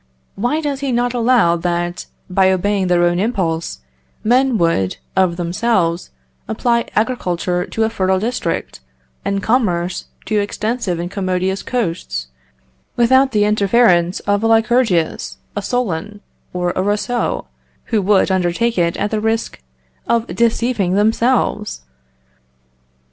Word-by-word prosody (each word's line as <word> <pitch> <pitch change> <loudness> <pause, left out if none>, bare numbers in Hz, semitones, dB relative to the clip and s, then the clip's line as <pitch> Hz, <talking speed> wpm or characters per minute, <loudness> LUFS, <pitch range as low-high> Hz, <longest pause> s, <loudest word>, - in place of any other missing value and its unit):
Why 245 +10 -1
does 285 -3 -2
he 275 -1 -2
not 245 0 0
allow 235 -7 +3
that, 175 0 -2 0.2
by 190 +1 +3
obeying 190 +1 0
their 175 -1 +3
own 175 0 +2
impulse, 170 - -1 0.4
men 250 +2 +3
would, 165 - +1 0.2
of 185 -2 +2
themselves, 175 -1 0 0.4
apply 235 +1 0
agriculture 180 -6 -1
to 225 - -1
a 220 - +2
fertile 190 -3 +1
district, 220 - -3 0.4
and 200 0 -1
commerce 185 -7 0 0.2
to 215 -1 +1
extensive 210 -2 -2
and 175 +1 -4
commodious 185 0 -1
coasts, 165 - -3 0.7
without 260 +3 +4
the 210 -2 +2
interference 200 -4 +3
of 205 0 0
a 225 - +2
Lycurgus, 225 -6 +1 0.2
a 205 - -1
Solon, 205 -3 -2 0.3
or 180 -1 -1
a - - +1
Rousseau, 210 +5 -1 0.5
who 215 - +3
would 195 0 +3
undertake 190 +5 +1
it 170 -1 +1
at 205 - -1
the 215 -1 -1
risk 225 - -2 0.5
of 235 -1 +2
deceiving 230 -5 +1
themselves? 220 0 +1
205 Hz, 125 wpm, -18 LUFS, 180-235 Hz, 0.7 s, without